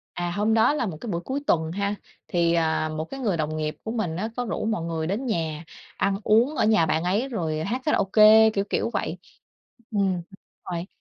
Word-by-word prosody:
À, 175 0 -2
hôm 210 +5 +1
đó 225 +6 +4
là 290 - -1
một 170 -6 -5
cái 235 - -5
buổi 170 -2 -2
cuối 265 +9 -3
tuần 160 -1 +1
ha. 200 +2 -1 0.3
Thì, 170 -1 +2
à, 160 -1 +1
một 155 0 -3
cái 270 +10 -8
người 210 -8 0
đồng 155 -1 -2
nghiệp 155 0 -3
của 220 - -5
mình 185 -9 -2
á, 215 +5 -2
có 245 - -1
rủ 225 - -3
mọi 220 -6 -1
người 165 -1 -2
đến 210 +10 -2
nhà 165 -7 -2 0.3
ăn 195 0 +1
uống 235 +7 +3
ở - - +2
nhà 215 -6 +4
bạn 160 +1 0
ấy 205 +9 0
rồi 160 -9 -2
hát 240 +8 -2
karaoke, 220 -4 +6
kiểu 200 -2 -1
kiểu - - 0
vậy. 180 - -2 0.7
Ừm, 200 -3 +1
đúng 175 - -5 0.5
rồi. 170 +1 -3
195 Hz, 225 wpm, -25 LUFS, 165-220 Hz, 0.7 s, karaoke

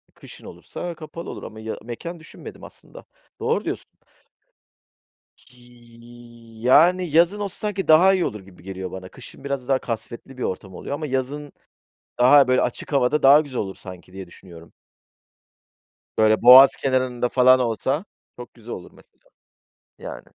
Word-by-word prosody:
Kışın - - -13
olursa 175 -1 -8
kapalı 155 +2 -9
olur - - -8
ama 110 0 -10
ya 110 0 -6
mekân 165 +9 -8
düşünmedim 155 - -12
aslında. - - -14 0.3
Doğru - - -1
diyorsun. - - -5 1.7
Y 120 -1 -17
yani 170 +8 +4
yazın 175 +5 +3
olsa 200 -2 -4
sanki 200 -2 -4
daha 175 +5 +6
iyi 185 -2 0
olur 105 - -5
gibi 95 -2 -18
geliyor 95 -1 -7
bana. 95 0 -9
Kışın 130 - -13
biraz 140 -2 -4
daha 135 -1 +2
kasvetli 120 +3 -7
bir - - -5
ortam 95 0 -5
oluyor 140 - -5
ama 155 0 -5
yazın 135 +2 -4 0.7
daha 135 +2 +6
böyle, 130 0 +2
açık - - -4
havada 140 +2 +1
daha 140 +2 +8
güzel 140 -5 -6
olur 95 -2 -4
sanki 90 -1 -12
diye 95 -1 -9
düşünüyorum. 85 -2 -15 1.4
Böyle 110 0 +3
boğaz 130 +3 +10
kenarında 130 -2 -1
falan 130 0 +5
olsa 130 - -2 0.3
çok 120 - -11
güzel 120 0 -10
olur 90 - -10
mesela. - - -23 0.8
Yani. - - -9
125 Hz, 150 wpm, -22 LUFS, 110-145 Hz, 1.7 s, boğaz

